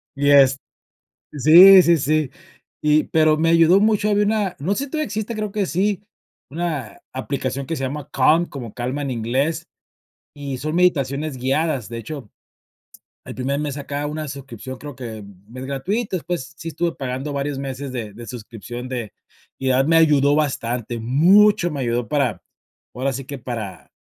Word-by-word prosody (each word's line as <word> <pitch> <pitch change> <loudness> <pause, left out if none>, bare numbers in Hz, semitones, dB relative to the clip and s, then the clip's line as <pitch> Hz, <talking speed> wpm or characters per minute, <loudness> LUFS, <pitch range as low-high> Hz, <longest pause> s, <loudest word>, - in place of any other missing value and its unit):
Y 145 +1 +2
est 135 -1 +6 0.7
sí, 175 +7 +9
sí, 170 -1 +4
sí 155 -1 0 0.5
y 150 0 +4
pero 155 -1 +3
me 165 +1 +2
ayudó 165 +3 +5
mucho, 210 -1 +2
había 205 0 +2
una, 205 -4 0
no 180 +8 0
sé 280 - -2
si - - -14
todavía 310 -1 -1
existe, 215 +2 -4
creo 210 -2 -3
que 205 -2 -1
sí, 195 +6 0 0.5
una 155 -7 -4
aplicación 135 0 -3
que 165 - -2
se 135 - -4
llama 145 +2 -4
Calm, 165 +3 +3
como 120 -6 -8
calma 130 +4 -3
en 135 - -3
inglés, 130 +7 -1 0.7
y 140 -3 -5
son 155 +4 -3
meditaciones 145 -5 +1
guiadas. 135 -1 -1
De 115 - -7
hecho, 120 -1 -8 0.9
el - - -8
primer 140 +3 -1
mes 145 -2 -3
sacaba 145 0 -4
una 155 +1 -4
suscripción 130 -2 -8
creo 145 -4 -9
que 115 -4 -7 0.3
mes 130 +2 -8
gratuito, 185 - -2
después 160 -4 -5
sí 165 - -7
estuve 170 +1 -2
pagando 135 +2 -4
varios 140 0 -3
meses 135 0 -5
de 110 -5 -5
de 120 +1 -10
suscripción 120 +1 -8
de 120 -5 -5 0.5
y 135 - -3
de - - +4
verdad 135 +2 +3
me 165 - +4
ayudó 145 -3 +4
bastante, 120 -5 -2
mucho 175 - +4
me 145 -2 -4
ayudó 120 -2 -1
para, 130 -10 0 0.5
ahora 135 +2 -1
sí 135 +1 -5
que 140 -1 -6
para 115 -5 -7
140 Hz, 175 wpm, -21 LUFS, 130-165 Hz, 0.9 s, sí